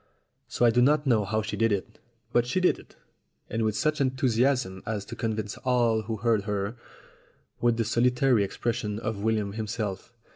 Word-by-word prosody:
So 120 - +1
I 120 - +6
do 120 +2 +3
not 145 +3 +3
know 115 -6 +3
how 110 +2 -1
she 105 - -4
did 115 0 +2
it; 100 -2 -3 0.3
but 120 0 +3
she 155 - 0
did 185 - +2
it, - - -17 0.6
and 115 - -1
with 110 -1 0
such 150 +6 0
enthusiasm 130 -5 +1
as 105 -2 -3
to 120 - -8
convince 110 -3 -3
all 120 -4 +2
who 110 +1 -4
heard 110 -2 +1
her, 105 +1 -2 0.8
with 120 -1 +2
the 115 - 0
solitary 125 0 +3
exception 110 +1 -2
of 110 -2 -4
William 105 -2 0
himself. 110 -1 -4
115 Hz, 180 wpm, -27 LUFS, 105-125 Hz, 0.8 s, I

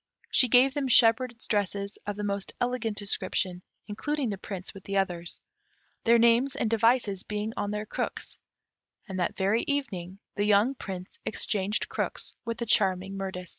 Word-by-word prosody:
She 255 - +5
gave 250 +3 +6
them 285 -2 -1
shepherds' 235 0 +4
dresses 200 -1 -1
of 205 - -2
the 210 - -5
most 200 -1 -2
elegant 245 -4 -1
description, 185 -2 -1 0.2
including 260 +4 -2
the 200 - -3
Prince 190 -2 -6
with 195 - -11
the 200 0 -1
others, 175 -3 -2 0.6
their 235 0 +6
names 235 +4 +4
and 235 - 0
devices 225 -3 +3
being 210 +2 -3
on 205 0 -2
their 210 +1 -3
crooks; - - -4 0.7
and 190 -2 -4
that 175 - -1
very 200 +4 +2
evening 195 -11 -2 0.2
the 205 - +1
young 210 +5 +4
Prince 190 -7 -7
exchanged 205 -1 -1
crooks - - -3
with 230 0 -3
the 235 - -2
charming 195 -3 +2
Mirtis. 190 -2 -5
210 Hz, 165 wpm, -28 LUFS, 195-235 Hz, 0.7 s, gave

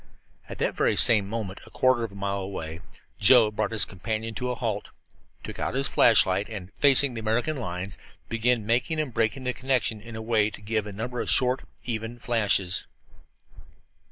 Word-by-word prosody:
At - - -7
that - - 0
very - - +2
same 105 -4 +5
moment, 105 -4 -5
a - - -14
quarter 130 -2 +2
of 115 - -4
a - - -14
mile 100 0 -2
away, 85 -4 -6 0.4
Joe 110 0 +6
brought 105 - -1
his 110 - +1
companion 110 +4 -4
to 125 +2 -3
a 125 - -2
halt, 110 -4 -3 0.5
took - - -8
out - - -2
his 135 0 0
flashlight, 100 -3 +4
and, 100 -4 -8
facing 140 -2 +4
the 115 - -5
American 115 +8 -1
line, 90 -7 -5 0.4
began 115 -1 0
making 125 +8 0
and 145 -6 -3
breaking 115 +5 0
the 125 0 -1
connection 130 -5 -1
in 115 +1 -10
a - - -5
way 110 -2 +2
to 105 - -11
give 105 0 -2
a - - -6
number 120 +4 -4
of - - -3
short, 125 0 +2 0.2
even 115 0 -4
flashes. 105 -6 +1
115 Hz, 185 wpm, -26 LUFS, 105-125 Hz, 0.5 s, Joe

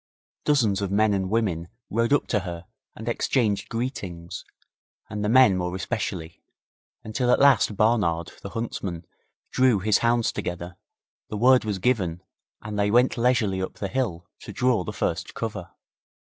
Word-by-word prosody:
Dozens 110 -10 +2
of 100 - -1
men 105 +2 +3
and 95 -1 -1
women 95 -7 0 0.2
rode 115 +3 +1
up 145 - +3
to 105 - +2
her 85 -2 -7 0.3
and 110 - -9
exchanged 110 -3 0
greetings, 95 -9 -5 0.7
the 105 -1 -2
men 130 -5 +6
more 90 0 -2
especially, 85 -3 -4 0.6
until 115 +3 -1
at - - +4
last 135 -6 +5
Barnard, 90 -7 +1
the 100 - -7
huntsman, 100 -7 -4 0.5
drew 130 -4 +4
his 100 +1 +2
hounds 120 0 +2
together, 90 0 -5 0.5
the 105 - -4
word 125 +2 +5
was 105 -2 -1
given, 95 -5 0 0.4
and 105 -1 -4
they 100 0 +2
went 120 +4 +4
leisurely 115 -6 +1
up 95 - -4
the 100 - -4
hill 95 -9 -2
to - - -9
draw 125 -6 +1
the - - -5
first - - -3
cover. - - -4
105 Hz, 155 wpm, -25 LUFS, 95-120 Hz, 0.7 s, men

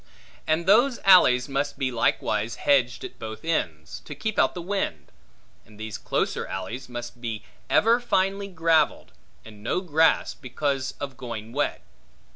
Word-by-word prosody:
And 160 +2 +1
those 240 +6 +4
alleys 140 -10 +6
must 140 +1 -2
be 130 -2 -1
likewise 115 -1 0
hedged 125 -4 +2
at - - -8
both 110 +4 -7
ends, 80 - -2
to 150 - -7
keep 215 +9 -2
out - - +3
the - - -4
wind; 175 - -3 0.5
and 105 0 -18
these 110 -1 -6
closer - - -1
alleys 95 +8 -6
must 120 0 -7
be 110 -3 -4 0.3
ever 230 +2 +4
finely 195 -3 0
gravelled, 165 -4 +1 0.3
and 105 -2 -13
no 115 - 0
grass, 160 -3 +2
because 135 0 -3
of 140 -2 -6
going 115 -4 -7
wet. 145 +2 -1
135 Hz, 150 wpm, -25 LUFS, 115-170 Hz, 0.5 s, alleys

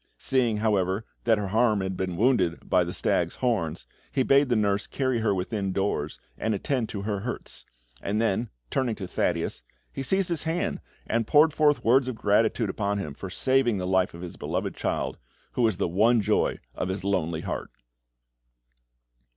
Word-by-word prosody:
Seeing, 120 -5 +1
however, 105 -1 +1 0.2
that 115 -2 +4
her 100 -2 -3
arm 110 -1 +3
had 95 0 -2
been 90 -2 -3
wounded 100 -7 +2
by - - +4
the - - -4
stag's - - 0
horns, 90 -10 -1 0.3
he 130 - +2
bade 140 +1 +4
the 120 - +3
nurse 100 -2 +1
carry 130 -3 0
her 110 -2 +1
within 95 +1 -2
doors, 95 -6 -1 0.2
and 110 -1 0
attend 120 +2 -1
to 100 -2 -5
her 100 -1 -1
hurts; 120 +5 -6 0.3
and 105 +2 -1
then, 115 +1 0 0.2
turning 125 -4 0
to 95 -3 -6
Thaddeus, 85 -2 -1 0.3
he - - -4
seized 190 +7 +1
his 170 -3 0
hand, 165 +2 -2 0.2
and 115 -1 0
poured 155 +1 +5
forth 150 -1 +3
words 130 +3 +4
of 130 - -3
gratitude 110 +2 +2
upon 100 0 -1
him 90 -8 -4
for 95 +6 -7
saving 130 +1 +2
the 90 - -3
life 95 -1 +1
of 85 - -9
his 90 - -8
beloved - - -3
child, - - -2 0.3
who - - -2
was 110 -6 +2
the 100 - 0
one 110 +7 +4
joy 105 0 +1 0.2
of - - -3
his 95 0 -3
lonely 85 -5 0
heart. - - -4
105 Hz, 185 wpm, -26 LUFS, 95-125 Hz, 0.3 s, poured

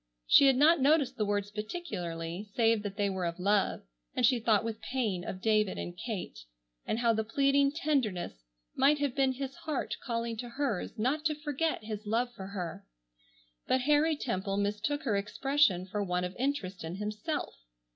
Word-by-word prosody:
She 275 - +7
had 270 - +5
not 300 +3 +5
noticed 275 -2 +3
the 210 -3 0
words 205 0 -1
particularly, 200 - -5
save 225 -2 +3
that 205 -1 -6
they 205 -1 +2
were 190 -3 -1
of 170 - -4
love, 200 +2 +1 0.3
and 245 - +3
she 245 +1 +4
thought 220 -2 +3
with 225 -1 -4
pain 220 -9 -1
of 185 +1 -6
David 215 -3 +2
and 175 - -5
Kate, 205 0 -5 0.5
and - - 0
how 235 -1 +3
the 220 0 0
pleading 275 +4 +3
tenderness 250 - -1 0.3
might 295 +2 +4
have 285 -3 -1
been 265 -1 +2
his 270 +1 -5
heart 305 -2 -3
calling 230 -2 -2
to 240 +2 -5
hers 240 -6 -2
not 265 +8 0
to 305 -1 +2
forget 300 -1 -2
his 215 -1 -6
love 240 +3 0
for 190 -4 -8
her. 180 -4 -5 0.8
But 260 - +2
Harry 300 +4 +3
Temple 195 -7 -2
mistook 210 +9 -1
her 215 - +1
expression 210 -1 +2
for 205 +2 -2
one 180 -1 -1
of 180 +1 -4
interest 245 -10 -2
in 165 +2 -5
himself. 215 - -3
225 Hz, 180 wpm, -31 LUFS, 200-275 Hz, 0.8 s, She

